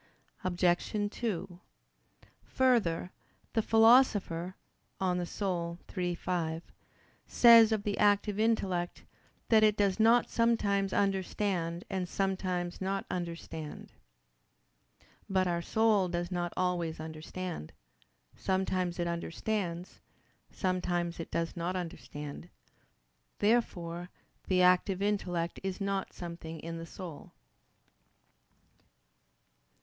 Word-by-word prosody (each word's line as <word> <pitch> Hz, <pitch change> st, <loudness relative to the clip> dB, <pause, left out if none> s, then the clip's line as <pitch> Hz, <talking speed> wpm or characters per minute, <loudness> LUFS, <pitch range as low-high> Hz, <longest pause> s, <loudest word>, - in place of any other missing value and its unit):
Obj. 185 Hz, +3 st, +1 dB
2: 185 Hz, -6 st, -3 dB, 0.8 s
Further, 215 Hz, -10 st, +1 dB, 0.4 s
the 225 Hz, -, +3 dB
Philosopher 220 Hz, -7 st, +4 dB, 0.4 s
(De 190 Hz, -, 0 dB
Anima 180 Hz, -1 st, -2 dB, 0.2 s
iii, 180 Hz, -2 st, -1 dB
5) 165 Hz, -2 st, -2 dB, 0.6 s
says 230 Hz, -2 st, +8 dB
of 215 Hz, -2 st, 0 dB
the 205 Hz, -1 st, -2 dB
active 205 Hz, 0 st, +3 dB
intellect, 190 Hz, -6 st, 0 dB, 0.5 s
"that 220 Hz, -2 st, +6 dB
it 215 Hz, -1 st, +4 dB
does 200 Hz, 0 st, +2 dB
not 230 Hz, +2 st, +5 dB
sometimes 205 Hz, -4 st, +1 dB
understand 190 Hz, -3 st, 0 dB
and 185 Hz, -3 st, -3 dB
sometimes 185 Hz, -2 st, -2 dB
not 195 Hz, +1 st, -1 dB
understand." 165 Hz, -3 st, -6 dB, 1.4 s
But 190 Hz, -1 st, +2 dB
our 170 Hz, -1 st, 0 dB
soul 215 Hz, 0 st, +2 dB
does 175 Hz, +1 st, -3 dB
not 175 Hz, -1 st, -1 dB
always 175 Hz, -3 st, -1 dB
understand: 160 Hz, -, -6 dB, 0.6 s
sometimes 185 Hz, -2 st, -1 dB
it 175 Hz, -, -1 dB
understands, 170 Hz, +1 st, -3 dB, 0.5 s
sometimes 175 Hz, -2 st, -1 dB
it 165 Hz, -, -5 dB
does 165 Hz, 0 st, -2 dB
not 175 Hz, +2 st, -2 dB
understand. 165 Hz, -3 st, -6 dB, 0.9 s
Therefore 175 Hz, -6 st, 0 dB, 0.4 s
the 185 Hz, -1 st, +3 dB
active 180 Hz, +1 st, +4 dB
intellect 180 Hz, -4 st, -1 dB
is 190 Hz, 0 st, -4 dB
not 195 Hz, -1 st, -2 dB
something 170 Hz, -2 st, -7 dB
in 165 Hz, 0 st, -6 dB
our 165 Hz, -, -6 dB
soul. 170 Hz, -6 st, -9 dB
185 Hz, 100 wpm, -31 LUFS, 170-205 Hz, 1.4 s, says